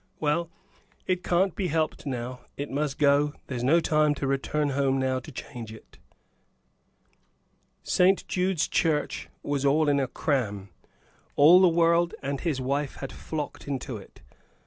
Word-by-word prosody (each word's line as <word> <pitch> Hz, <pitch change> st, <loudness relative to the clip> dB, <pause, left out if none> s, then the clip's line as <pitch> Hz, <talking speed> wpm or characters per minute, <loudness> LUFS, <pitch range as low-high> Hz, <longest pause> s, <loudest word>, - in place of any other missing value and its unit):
Well, 160 Hz, +3 st, 0 dB, 0.6 s
it 185 Hz, -1 st, 0 dB
can't 180 Hz, +1 st, +1 dB
be 190 Hz, -, -1 dB
helped 155 Hz, -2 st, -1 dB
now; 125 Hz, -1 st, -4 dB, 0.2 s
it 145 Hz, 0 st, -5 dB
must 145 Hz, 0 st, -2 dB
go; 145 Hz, 0 st, +3 dB
there's 125 Hz, -3 st, -4 dB
no 155 Hz, +7 st, +4 dB
time 150 Hz, -2 st, +2 dB
to 140 Hz, -, -3 dB
return 135 Hz, +2 st, 0 dB
home 135 Hz, -1 st, +1 dB
now 130 Hz, -1 st, 0 dB
to 150 Hz, -, -11 dB
change 120 Hz, -4 st, -8 dB
it." 110 Hz, -, -15 dB, 1.8 s
St. 185 Hz, +1 st, +3 dB
Jude's 180 Hz, -3 st, 0 dB
Church 155 Hz, -3 st, 0 dB
was 145 Hz, -1 st, -1 dB
in 145 Hz, 0 st, +3 dB
a 135 Hz, -, 0 dB
cram; 110 Hz, -9 st, -2 dB, 0.7 s
all 170 Hz, +6 st, +7 dB
the 185 Hz, -, +6 dB
world 170 Hz, +1 st, +2 dB
and 140 Hz, 0 st, -2 dB
his 155 Hz, -6 st, -1 dB
wife 140 Hz, +2 st, -2 dB
had 135 Hz, -, -7 dB
flocked 150 Hz, -3 st, -6 dB
into 135 Hz, -3 st, -4 dB
it. 100 Hz, -, -15 dB
145 Hz, 145 wpm, -27 LUFS, 135-165 Hz, 1.8 s, all